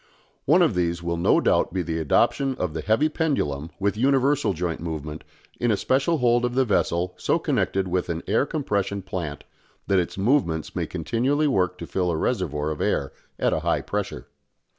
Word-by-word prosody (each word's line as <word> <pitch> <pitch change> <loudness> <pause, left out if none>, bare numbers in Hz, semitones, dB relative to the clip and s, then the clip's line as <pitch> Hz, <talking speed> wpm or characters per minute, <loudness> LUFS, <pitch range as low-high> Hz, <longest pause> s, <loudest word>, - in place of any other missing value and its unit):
One 170 +6 +5
of 160 - +2
these 85 -1 -1
will 85 0 -1
no 85 - +3
doubt - - +2
be 95 -2 0
the 80 0 -2
adoption 130 - +2
of 90 -9 -3
the 80 - -3
heavy 110 - +2
pendulum 110 - -1
with 100 +1 0
universal 135 +2 +2
joint 85 -2 -3
movement 80 -2 -5 0.4
in 120 - +1
a 105 - +2
special 140 +9 +1
hold 120 -2 +3
of 120 0 -1
the 130 0 +3
vessel 90 -4 0
so - - +1
connected 95 -1 0
with 90 0 -1
an 85 -1 -3
air 115 +7 +1
compression 100 - -2
plant 85 -6 -5 0.4
that 95 -1 +3
its 85 - -3
movements 95 - +1
may - - -1
continually 125 - 0
work 90 -8 +1
to - - -6
fill 90 -2 -1
a 85 - 0
reservoir 80 - -1
of 75 - -5
air 70 - 0 0.2
at - - +1
a - - +1
high - - 0
pressure. - - -4
95 Hz, 190 wpm, -24 LUFS, 85-125 Hz, 0.4 s, One